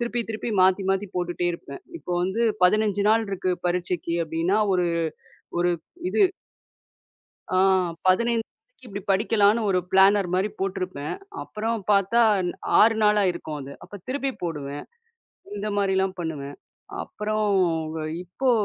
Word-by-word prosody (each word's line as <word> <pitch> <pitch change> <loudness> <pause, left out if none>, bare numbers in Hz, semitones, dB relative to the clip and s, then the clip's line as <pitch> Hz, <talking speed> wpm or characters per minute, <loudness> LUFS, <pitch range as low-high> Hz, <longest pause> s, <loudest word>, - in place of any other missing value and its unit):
திருப்பி 240 0 -1
திருப்பி. 220 +2 -4
மாத்தி 190 +1 +3
மாத்தி 195 +1 0
போட்டுட்டே 175 0 -1
இருப்பேன். 265 - -9 0.2
இப்ப 180 - -9
வந்து 190 +5 -1 0.2
15 205 +1 +3
நாள் 225 +1 +4
இருக்கு 185 -1 -1 0.2
பரீட்சைக்கு 175 -1 -1
அப்பிடின்னா, 165 +5 0 0.2
ஒரு 180 -1 +2 0.7
ஒரு, 175 0 +2 0.4
இது 410 - +2 1.3
அ - - +3 0.5
15 230 +4 +2
நாளைக்கி - - -23
இப்பிடி 200 -2 -6
படிக்கலான்னு 210 +2 +3
ஒரு 185 -2 +3
பிளானர் 195 0 +5
மாரி 190 +3 +1
போட்டுருப்பேன். 185 -6 -3 0.3
அப்புறம் 220 0 -3
பார்த்தா 200 +4 +3 0.3
ன் - - -1 0.3
6 225 +1 +6
நாளாயிருக்கும் 185 -7 +1
அது. 135 +1 -8
அப்ப 205 - -10
திருப்பி 275 +1 -1
போடுவேன். 145 -4 -4 0.7
இந்த 205 +1 -3
மாரிலாம் 190 -1 +1
பண்ணுவேன். 145 -4 -5 0.5
அப்புறம், 215 +1 -2 0.5
வ - - -3 0.2
இப்போ 220 +9 -1
195 Hz, 130 wpm, -25 LUFS, 180-215 Hz, 1.3 s, 6